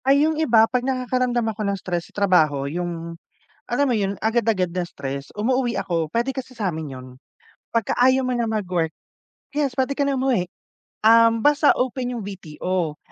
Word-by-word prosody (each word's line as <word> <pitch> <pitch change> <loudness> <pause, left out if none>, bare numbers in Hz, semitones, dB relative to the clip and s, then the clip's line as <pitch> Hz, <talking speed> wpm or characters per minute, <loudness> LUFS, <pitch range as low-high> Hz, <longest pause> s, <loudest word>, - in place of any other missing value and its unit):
Ay, 280 +2 +5
'yong 315 0 0
iba 230 -7 +5
'pag 250 +2 -1
nakakaramdam 255 -2 0
ako 215 - -7
ng 200 -1 -1
stress 175 -2 -4
sa - - -26
trabaho 155 -7 +3
yung, 170 +2 -5 0.5
alam 285 - +1
mo - - +2
'yun 200 -1 -1
agad-agad 220 -5 +1
na 180 0 -2
stress. 140 -4 -6
Umuuwi 245 +3 0
ako, 165 -2 -1
puwede 235 - -1
kasi 260 -1 -7
sa'min 160 - -3
'yon. 130 0 -9 0.7
'Pagka 230 -3 0
ayaw 260 +2 +4
mo 255 - -1
na 235 - 0
mag-work, 180 -7 -1 0.6
yes, 290 -2 +1
puwede 260 +3 -1
ka 285 - +1
na 280 -2 0
umuwi. 240 -10 0 0.6
Um, 230 0 +6
basta 295 +4 +4
open 250 0 -1
'yong 235 -5 -5
VTO. 175 -3 -3
220 Hz, 175 wpm, -22 LUFS, 175-255 Hz, 0.7 s, Um